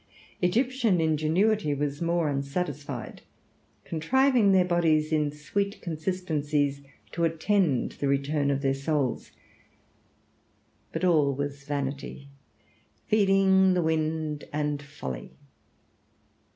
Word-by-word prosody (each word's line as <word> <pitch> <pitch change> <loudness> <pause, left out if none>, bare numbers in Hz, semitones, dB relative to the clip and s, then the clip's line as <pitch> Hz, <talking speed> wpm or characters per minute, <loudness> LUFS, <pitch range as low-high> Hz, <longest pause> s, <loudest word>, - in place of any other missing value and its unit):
Egyptian 230 +1 +2
ingenuity 160 +3 +1
was 145 +1 -3
more 170 -1 +1
unsatisfied, 145 +1 -4 0.6
contriving 240 - +3
their 185 -2 +4
bodies 165 -3 +2
in 150 -2 +1
sweet 200 +8 -3
consistencies 155 -5 -1 0.3
to 170 - -2
attend 165 - +1
the 140 - -3
return 140 +1 +1
of 140 0 -1
their 135 0 +2
souls. 135 -2 -2 1.6
But - - -4
all 150 -6 +3
was 140 0 -4
vanity, 140 0 -4 0.8
feeding 195 -2 +4
the 175 - +1
wind 155 -1 -1
and 150 -1 -1
folly. 65 - -7
155 Hz, 100 wpm, -27 LUFS, 145-180 Hz, 1.6 s, their